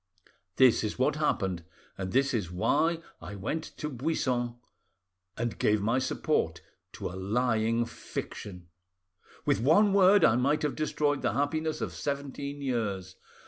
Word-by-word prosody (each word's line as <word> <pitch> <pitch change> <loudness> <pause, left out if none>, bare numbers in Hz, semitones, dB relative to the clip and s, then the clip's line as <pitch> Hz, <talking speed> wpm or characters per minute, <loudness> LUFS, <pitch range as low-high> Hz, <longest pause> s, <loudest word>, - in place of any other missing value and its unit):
This 130 -4 +5
is 105 - -3
what 140 +4 +1
happened, 95 - 0 0.3
and 95 -1 -4
this 135 +1 +2
is 105 -8 -1
why 160 - +1 0.2
I 105 - -7
went 150 +11 -3
to 150 - -3
Buissan 125 -4 -1 0.8
and 120 -1 -3
gave 105 0 +3
my 115 +5 +1
support 130 - 0 0.3
to - - -5
a - - -9
lying 115 +3 +1
fiction. 90 -5 -7 0.8
With - - +2
one 195 - +4
word 195 -1 +6
I 115 - +4
might 140 +5 +1
have 150 - 0
destroyed 150 -2 0
the - - 0
happiness 155 +4 -1
of - - -3
seventeen 140 0 -4
years. 100 -8 -2
130 Hz, 145 wpm, -29 LUFS, 105-150 Hz, 0.8 s, word